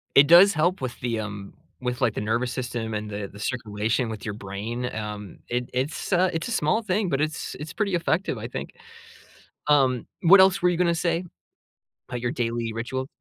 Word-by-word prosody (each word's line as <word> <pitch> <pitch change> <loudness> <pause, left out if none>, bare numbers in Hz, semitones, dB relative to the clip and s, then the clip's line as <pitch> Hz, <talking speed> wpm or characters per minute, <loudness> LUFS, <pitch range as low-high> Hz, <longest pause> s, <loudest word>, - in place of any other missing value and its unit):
It 140 +1 +8
does 180 +4 +9
help 175 +3 +1
with 130 -2 -4
the, 115 -3 -1
um 100 -2 -7 0.3
with, 125 0 -3
like, 120 -5 +2
the - - -2
nervous 115 +4 0
system 120 -3 -3
and 105 0 -4
the 100 -1 -4
the 100 - -13
circulation 110 +1 -1
with 110 -2 -6
your 110 - -3
brain. 105 +5 -4
Um, 105 -3 -6
it 125 +1 -2
it's 135 +9 -2
uh, 180 +1 +3
it's 165 +7 -3
a - - -3
small 220 +3 +1
thing, 205 -1 0
but 135 - 0
it's 155 +1 -2
it's 150 - -6
pretty 205 -4 0
effective, 170 +2 0
I - - -5
think. - - -6 0.9
Um, 130 -5 +3 0.2
what 190 +3 +8
else 190 0 +5
were 180 - +5
you 175 - +1
gonna 170 -1 +2
say 170 +1 0 0.9
about 125 -1 -4
your 120 0 -1
daily 115 -4 -2
ritual? 130 +3 -3
125 Hz, 200 wpm, -25 LUFS, 110-170 Hz, 0.9 s, does